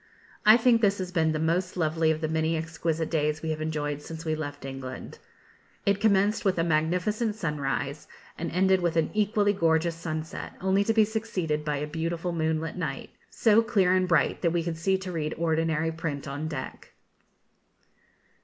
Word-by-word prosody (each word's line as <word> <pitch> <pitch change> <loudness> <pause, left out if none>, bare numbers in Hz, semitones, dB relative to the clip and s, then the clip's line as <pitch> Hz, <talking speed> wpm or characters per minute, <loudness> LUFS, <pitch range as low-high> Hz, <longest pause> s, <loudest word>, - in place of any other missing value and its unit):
I 215 +2 +9
think 235 -1 +4
this 200 -2 +3
has 185 -1 -4
been 160 -3 +2
the 155 - -1
most 175 +4 0
lovely 160 -1 +1
of 160 0 0
the 155 - 0
many 160 +1 0
exquisite 160 0 -2
days 150 -1 0
we 160 - -1
have 155 0 -3
enjoyed 150 -2 -2
since 160 +2 -8
we 155 - 0
left 145 -2 -5
England. 135 -1 -7 0.7
It 200 0 +2
commenced 205 0 +3
with 190 -4 +1
a 165 - +2
magnificent 180 +8 0
sunrise, 150 -4 -3 0.3
and 170 - -4
ended 190 +1 +3
with 170 -1 0
an 160 - +1
equally 210 -1 +2
gorgeous 165 -2 +2
sunset, 160 -1 -5
only 190 +2 +2
to 225 - +2
be 220 -1 +6
succeeded 190 -9 -2
by 150 -1 -1
a 145 - -2
beautiful 165 +3 -3
moonlight 160 0 -1
night, 150 -6 -4 0.2
so 225 -1 +4
clear 195 -5 +2
and 185 0 +2
bright 170 -5 +2
that 170 - +3
we 170 0 0
could 165 -1 -3
see 190 +3 +2
to 190 -1 -6
read 155 -3 -2
ordinary 160 -1 +1
print 155 -4 -4
on 145 +3 -4
deck. 150 -5 -7
165 Hz, 180 wpm, -27 LUFS, 155-190 Hz, 0.7 s, I